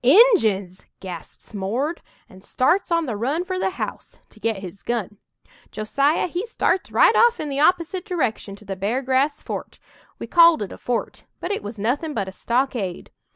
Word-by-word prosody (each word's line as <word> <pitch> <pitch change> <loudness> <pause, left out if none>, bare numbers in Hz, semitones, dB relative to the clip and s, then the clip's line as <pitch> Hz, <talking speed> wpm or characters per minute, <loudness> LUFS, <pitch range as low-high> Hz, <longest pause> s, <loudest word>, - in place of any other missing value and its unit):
"Injuns!" 235 - +4
gasps 180 +3 -9
Mord, 235 - -2 0.3
and 185 0 -16
starts 350 - +1
on 335 -1 +2
the 240 -6 -3
run 280 - -1
for 370 0 -3
the - - +1
house 375 - -6
to 215 - -18
get 225 -1 -1
his 195 0 -9
gun. 215 -4 -3 0.5
Josiah, 275 +8 +1
he 355 +2 -3
starts 385 - 0
right - - +5
off 475 0 +5
in 300 - -3
the 275 0 -2
opposite 350 +3 +2
direction 260 - -2
to 210 - -16
the 195 -1 -4
Beargrass 260 +8 0
fort - - -6 0.4
we - - -6
called 335 -7 +6
it 195 - -7
a - - -9
fort, 245 -2 -3
but 355 - -4
it 405 - -1
was 210 +2 -7
nothin' 280 +9 -1
but 200 -4 -1
a - - -5
stockade. 235 -4 -2
255 Hz, 180 wpm, -23 LUFS, 205-335 Hz, 0.5 s, called